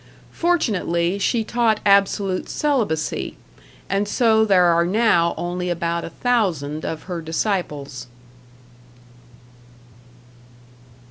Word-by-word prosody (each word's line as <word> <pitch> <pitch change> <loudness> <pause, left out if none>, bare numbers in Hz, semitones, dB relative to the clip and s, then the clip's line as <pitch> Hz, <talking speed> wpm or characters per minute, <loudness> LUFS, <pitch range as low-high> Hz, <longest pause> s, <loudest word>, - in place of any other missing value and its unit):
Fortunately 200 - 0
she 225 +3 +1
taught 225 -1 +1
absolute 200 -1 +2
celibacy, 230 - -1 0.5
and 195 +1 0
so 220 0 +3
there 190 -4 +4
are 170 0 +4
now 175 -3 +2
only 180 +1 -3
about 170 0 -2
a - - -6
thousand 170 - -1
of 160 - -4
her 175 -3 -5
disciples. 155 - -3
185 Hz, 90 wpm, -21 LUFS, 170-220 Hz, 0.5 s, there